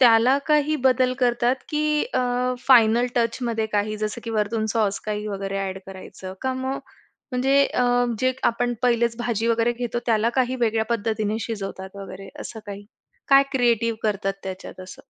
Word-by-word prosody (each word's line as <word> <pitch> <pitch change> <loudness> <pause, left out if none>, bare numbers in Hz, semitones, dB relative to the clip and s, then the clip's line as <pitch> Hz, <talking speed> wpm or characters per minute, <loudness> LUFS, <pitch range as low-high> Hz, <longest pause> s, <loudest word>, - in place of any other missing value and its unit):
त्याला 245 +2 +6
काही 300 0 +3
बदल 255 0 +3
करतात 245 +1 +2
की 300 0 +1
अ, - - +3 0.5
फायनल 235 -1 +6
टचमध्ये 230 -1 0
काही, 215 +1 0
जसं 215 +2 -3
की 230 - -4
वरतून 220 0 0
सॉस 205 -3 +1
काही 210 0 -2
वगैरे 195 -1 -3
ॲड 190 0 -5
करायचं 190 0 -9
का 260 0 0
मग 265 +1 -2 0.5
म्हणजे 265 +2 +2
अ, 250 - 0 0.3
जे 255 0 +2 0.2
आपण 240 +1 -1
पहिलेच 235 -1 +2
भाजी 230 -2 -1
वगैरे 230 +1 +2
घेतो, 240 0 -3
त्याला 225 0 +3
काही 255 +1 0
वेगळ्या 220 -1 +2
पद्धतीने 215 -1 -1
शिजवतात 195 -3 -6
वगैरे 195 0 -9
असं 220 - -7
काही 200 0 -7 0.4
काय 275 0 +7
क्रिएटिव्ह 230 -3 +2
करतात 195 -2 0
त्याच्यात 185 0 -7
असं? 190 +9 -11
230 Hz, 160 wpm, -23 LUFS, 210-245 Hz, 0.5 s, काय